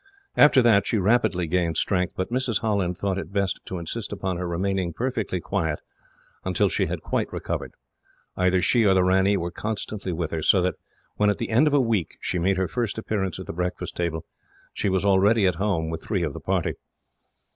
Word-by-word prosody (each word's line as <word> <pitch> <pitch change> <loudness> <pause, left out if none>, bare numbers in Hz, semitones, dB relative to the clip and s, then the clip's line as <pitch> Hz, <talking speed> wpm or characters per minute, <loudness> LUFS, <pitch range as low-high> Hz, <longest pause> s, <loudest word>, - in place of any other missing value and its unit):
After 145 -3 +6
that, 105 -4 +4
she 115 - +1
rapidly 100 -3 +2
gained 85 0 0
strength; 90 -2 0
but 95 +4 -2
Mrs. 125 -3 0
Holland 100 -5 0
thought 95 -1 -1
it 95 - -7
best 100 -1 0
to 95 - -5
insist 90 +7 -4
upon 95 -3 -3
her 90 0 -3
remaining 90 0 -1
perfectly 115 -6 -2
quiet, 80 -5 -2 0.6
until 95 -1 +1
she - - 0
had - - -4
quite - - -1
recovered. - - -4 0.6
Either 90 -1 +2
she 115 +5 +3
or 95 -2 +4
the 95 - +4
ranee 95 +2 +3
were 85 -1 -3
constantly 105 -1 -4
with 85 -2 -3
her, 80 - -2
so 95 - +4
that 90 - +1 0.4
when, 105 0 +3
at 105 - +1
the - - -4
end 125 +8 +4
of 150 - +1
a - - +5
week, 115 - 0
she 90 - -2
made 95 +3 +1
her 95 -1 +1
first 120 -1 -2
appearance 100 -5 -2
at - - -7
the - - -6
breakfast 90 +1 -3
table, 80 -2 -2 0.5
she - - -1
was 95 +1 +1
already 100 +2 +4
at 90 -3 +1
home 85 -6 0
with 80 0 -4
three 95 -5 -1
of 75 -4 -2
the - - -7
party. - - -1
95 Hz, 210 wpm, -25 LUFS, 90-105 Hz, 0.6 s, After